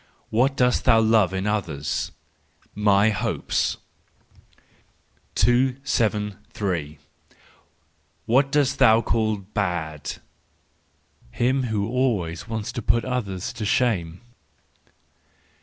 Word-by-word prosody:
What 130 +5 +2
dost 125 -1 +2
thou 115 -3 +6
Love 110 -4 +3
in 95 +1 -3
others 80 -10 -2 0.6
?—My 105 0 +3
hopes. 100 - -1 1.6
273 105 - 0 1.3
Whom 135 +5 +3
dost 140 -1 +1
thou 110 +1 +6
call 110 -2 0
Bad? 90 -7 -3 1.2
—Him 130 - 0
who 105 -3 -1
always 110 -10 -1
wants 110 -2 -4
to 120 - -5
put 115 +2 +1
others 100 -8 -3
to 110 - -6
shame. 95 -6 0
110 Hz, 90 wpm, -24 LUFS, 95-120 Hz, 1.6 s, thou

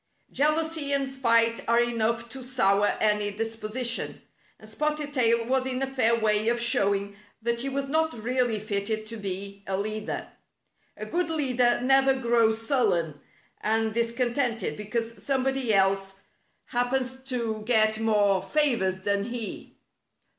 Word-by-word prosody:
Jealousy 305 0 0
and 275 -1 +1
spite 230 -3 +2
are 235 0 +4
enough 235 -1 0
to 260 +4 -9
sour 205 -5 +2
any 210 -1 +2
disposition, 225 +3 -3 0.4
and 215 - -14
Spotted 300 +5 -2
Tail 235 -3 +3
was 260 0 +1
in 255 -1 -2
a - - +2
fair 255 -4 +2
way 215 0 +2
of 235 +1 +2
showing 200 -3 +1 0.2
that 235 +1 -2
he 275 - -2
was 275 0 -2
not 320 +3 +1
really 240 -1 0
fitted 215 +1 -2
to 230 +1 -7
be 200 0 -5
a 190 0 -1
leader. 215 +1 -4 0.7
A - - -5
good 350 0 -1
leader 255 -6 +2
never 270 +1 +4
grows 230 -3 +2
sullen 170 - +1 0.4
and 220 0 0
discontented 235 +1 0
because 225 +2 -4
somebody 265 -3 0
else 195 0 +1 0.4
happens 255 +1 -1
to 235 -5 -3
get 220 -2 +3
more 205 -3 +2
favors 195 -7 +1
than 200 0 0
he. 235 -2 -6
230 Hz, 140 wpm, -26 LUFS, 215-260 Hz, 0.7 s, are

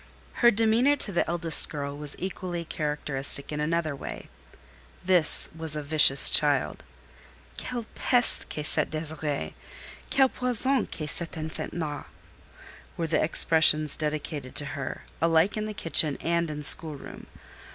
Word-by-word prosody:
Her 240 - +7
demeanour 230 +5 +2
to 230 - -5
the 175 - -1
eldest 170 -2 +3
girl 140 -1 -6
was 145 0 -5
equally 180 -2 -6
characteristic 150 -3 -3
in 150 - -4
another 160 -1 -2
way. - - -9 0.8
This 180 -4 +5
was 160 -2 -3
a 150 - -5
vicious 145 -2 +6
child. 145 -3 +2 0.8
"Quelle 245 -2 -6
peste 245 -2 +2
que 150 - -5
cette - - 0
Désirée! 155 -2 -4 0.6
Quel 265 -1 +3
poison 250 +2 +2
que 155 - -7
cet 165 +3 -2
enfant 155 0 -6
là!" 150 -4 -5 0.9
were 170 - -2
the 160 - 0
expressions 155 -2 +3
dedicated 150 -3 -5
to 145 - -1
her, 140 -3 -6 0.2
alike 165 +3 +2
in 215 0 -4
kitchen 155 -4 +1
and 170 -1 -1
in 150 -1 -7
schoolroom. 150 -1 -3
160 Hz, 135 wpm, -26 LUFS, 150-175 Hz, 0.9 s, Her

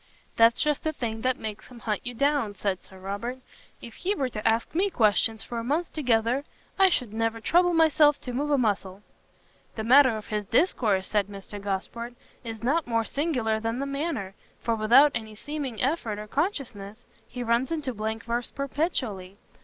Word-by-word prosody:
"That's 230 0 +5
just 300 -1 +1
the 315 - -1
thing 225 -5 -4
that 255 +1 +1
makes 215 -1 -7
him 250 - -13
hunt 215 -3 -2
you 245 0 -5
down," 280 -5 +1
said 190 -1 -2
Sir 190 - -15
Robert; 200 +7 -4 0.5
"if 235 - -9
he 390 +3 -1
were 265 -8 -1
to 215 -2 -3
ask 225 +1 +1
me 380 +5 +2
questions 220 - +2
for 235 - -5
a - - -4
month 305 +8 -1
together, 245 -2 +1 0.4
I 385 -1 +7
should 250 - -1
never 225 0 -1
trouble 350 +8 +3
myself 310 -2 +5
to 250 - -6
move 285 +4 -1
a 290 - +3
muscle." 200 -4 -1 0.7
"The 220 - -3
matter 255 0 +6
of 215 - -8
his 210 -2 -2
discourse," 225 - +2
said 205 -2 +1
Mr 200 0 -8
Gosport, 225 +5 -4 0.3
"is 225 -1 -7
not 290 +5 +1
more 230 -1 +1
singular 250 -8 0
than 225 +2 -2
the 275 - -2
manner, 275 - -3 0.3
for 230 - +1
without 235 +7 +6
any 220 -1 -5
seeming 280 -1 -5
effort 250 -7 -1
or 210 - -6
consciousness, 245 - -3 0.2
he 245 0 -5
runs 235 +5 +1
into 300 -6 -2
blank 220 +1 -3
verse 235 +1 -2
perpetually. 255 - -3
235 Hz, 185 wpm, -27 LUFS, 215-280 Hz, 0.7 s, I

